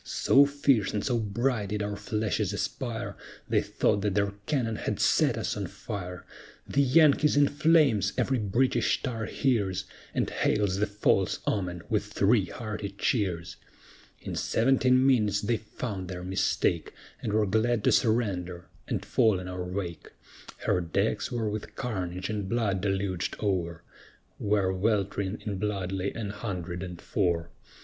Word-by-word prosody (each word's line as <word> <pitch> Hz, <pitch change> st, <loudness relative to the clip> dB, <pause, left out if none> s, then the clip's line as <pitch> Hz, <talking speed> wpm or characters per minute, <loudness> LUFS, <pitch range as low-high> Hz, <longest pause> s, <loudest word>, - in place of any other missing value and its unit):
So 140 Hz, +1 st, +4 dB
fierce 140 Hz, -8 st, +2 dB
and 105 Hz, -, -1 dB
so 120 Hz, -3 st, +1 dB
bright 110 Hz, 0 st, -1 dB
did 105 Hz, 0 st, -1 dB
our 105 Hz, 0 st, -3 dB
flashes 105 Hz, -2 st, -1 dB
aspire, 120 Hz, +2 st, -3 dB, 0.3 s
They -, -, +2 dB
thought 100 Hz, -, +1 dB
that 100 Hz, -1 st, 0 dB
their 100 Hz, -1 st, +2 dB, 0.2 s
cannon 120 Hz, -7 st, 0 dB
had -, -, -3 dB
set -, -, +3 dB
us -, -, -2 dB
on -, -, -3 dB
fire, 90 Hz, -3 st, -7 dB, 0.4 s
"The 140 Hz, -, +2 dB
Yankee's 150 Hz, +1 st, +5 dB
in 145 Hz, 0 st, +6 dB
flames!" 150 Hz, -, +3 dB
every 130 Hz, -2 st, +1 dB
British 115 Hz, +5 st, +1 dB
tar 115 Hz, -5 st, -2 dB
hears, 100 Hz, -8 st, 0 dB, 0.3 s
And -, -, +1 dB
hails 100 Hz, -3 st, +1 dB
the 105 Hz, +2 st, +1 dB
false 100 Hz, -2 st, +1 dB
omen 90 Hz, -4 st, -2 dB
with 105 Hz, -2 st, 0 dB
three 105 Hz, 0 st, +3 dB
hearty 105 Hz, +1 st, -5 dB
cheers. 95 Hz, -9 st, -1 dB, 0.6 s
In -, -, -6 dB
seventeen 130 Hz, +1 st, +3 dB
minutes 105 Hz, -6 st, +3 dB
they 115 Hz, +2 st, +1 dB
found 105 Hz, -3 st, -6 dB
their 90 Hz, 0 st, -6 dB
mistake, 95 Hz, +1 st, 0 dB, 0.3 s
And -, -, -2 dB
were 105 Hz, 0 st, +3 dB
glad 110 Hz, +2 st, +1 dB
to -, -, +4 dB
surrender 95 Hz, -7 st, 0 dB, 0.2 s
and -, -, -2 dB
fall 110 Hz, -4 st, +3 dB
in 90 Hz, -, -7 dB
our 90 Hz, 0 st, -4 dB
wake; 90 Hz, -2 st, -5 dB, 0.5 s
Her 90 Hz, -, +2 dB
decks 100 Hz, +10 st, -1 dB
were 115 Hz, -3 st, -1 dB
with 105 Hz, 0 st, -5 dB
carnage 95 Hz, -7 st, -3 dB
and 105 Hz, -3 st, -3 dB
blood 105 Hz, -5 st, 0 dB
deluged 95 Hz, -3 st, -1 dB
o'er, 85 Hz, -5 st, -1 dB, 0.6 s
Where 100 Hz, -2 st, +1 dB
welt'ring 100 Hz, 0 st, -1 dB
in 100 Hz, -3 st, -3 dB
blood 100 Hz, -3 st, -2 dB
lay 95 Hz, 0 st, -1 dB
an 105 Hz, -3 st, -4 dB
hundred 90 Hz, -5 st, -5 dB
and 90 Hz, -2 st, -6 dB
four. 85 Hz, -4 st, -1 dB
105 Hz, 155 wpm, -28 LUFS, 95-115 Hz, 0.6 s, in